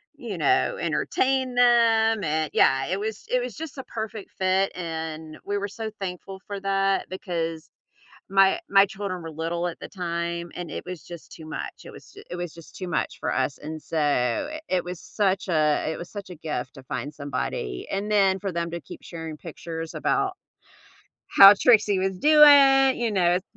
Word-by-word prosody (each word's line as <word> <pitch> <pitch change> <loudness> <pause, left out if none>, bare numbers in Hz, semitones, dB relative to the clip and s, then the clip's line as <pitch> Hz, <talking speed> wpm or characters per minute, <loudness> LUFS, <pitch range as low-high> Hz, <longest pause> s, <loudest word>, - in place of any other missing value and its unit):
you 235 -9 -6
know, 385 - +2
entertain 260 -1 0
them, 230 -3 +4
and 155 0 0
yeah, 135 0 +4
it 190 +3 -1
was, 215 0 -5
it 250 - +2
was 245 -3 -5
just 310 -2 -7
a 265 - -5
perfect 220 -2 -6
fit 190 +1 +1
and 160 -2 -5
we 205 0 -1
were 205 0 -2
so 220 +2 -5
thankful 190 0 -6
for 200 -1 -5
that 195 0 0
because 165 -4 -4 0.6
my 195 - +4
my 195 0 +6
children 195 -3 -5
were 165 - -7
little 170 +2 -2
at 170 - -6
the - - -7
time 170 -2 -4
and 175 -1 -6
it - - -6
was 180 -2 -7
just 170 -2 -11
too 160 - -11
much. 155 - -7
It - - -9
was - - -14
ju 405 - -13
it - - -5
was 175 -2 -5
just 165 -1 -14
too 185 - -6
much 175 - -2
for - - -2
us 140 - -1
and 155 +1 -7
so 145 - 0 0.2
it 185 -1 0
was 180 -1 -6
such 195 -2 -1
a 155 -4 +2
it 160 - -3
was 175 - -8
such 205 -2 -8
a 180 - -8
gift 150 -5 -5
to 135 - -12
find 145 +2 -5
somebody 140 - -4
and 200 +2 -3
then 195 -2 +4
for 195 -1 -3
them 170 -1 -2
to 170 -1 -5
keep - - -11
sharing 165 -2 -7
pictures 165 0 -7
about 395 -2 0 0.9
how 195 +1 +10
Trixie 210 -5 +4
was 190 0 -1
doing, 280 -2 +7
you 235 -2 0
know, 180 -4 +3
s 180 +1 +1
185 Hz, 195 wpm, -25 LUFS, 165-210 Hz, 0.9 s, how